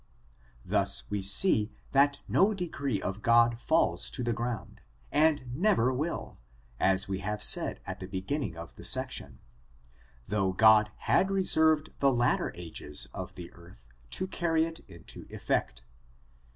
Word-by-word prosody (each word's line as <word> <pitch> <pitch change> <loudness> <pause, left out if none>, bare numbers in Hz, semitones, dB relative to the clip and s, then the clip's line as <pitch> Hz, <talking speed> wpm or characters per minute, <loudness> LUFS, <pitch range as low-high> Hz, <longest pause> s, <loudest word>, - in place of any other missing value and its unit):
Thus - - +2
we 105 -1 -1
see 105 - +2 0.2
that 140 +1 +3
no 210 +2 +3
decree 140 - -3
of 95 +2 -5
God 115 0 +4
falls 165 +1 +2
to 125 - -3
the 120 0 0
ground, 120 -1 -5 0.3
and 145 -5 +1
never 165 - +2
will, 150 +7 -4 0.4
as 95 +1 +2
we 95 -1 -3
have 105 +2 -3
said - - +2
at - - -6
the 95 - -7
beginning 95 - -4
of 85 0 -10
the - - -11
section, - - -2 0.9
though 100 -2 0
God 110 +1 +5 0.2
had 190 - +3
reserved 160 -5 +2
the 140 -1 +4
latter 120 0 +1
ages 80 -4 -1
of - - -7
the 90 -2 -10
earth 85 -7 -17 0.2
to 185 - -3
carry 165 -3 0
it 165 0 -7
into 85 -3 -10
effect. - - -2
120 Hz, 145 wpm, -29 LUFS, 95-155 Hz, 0.9 s, God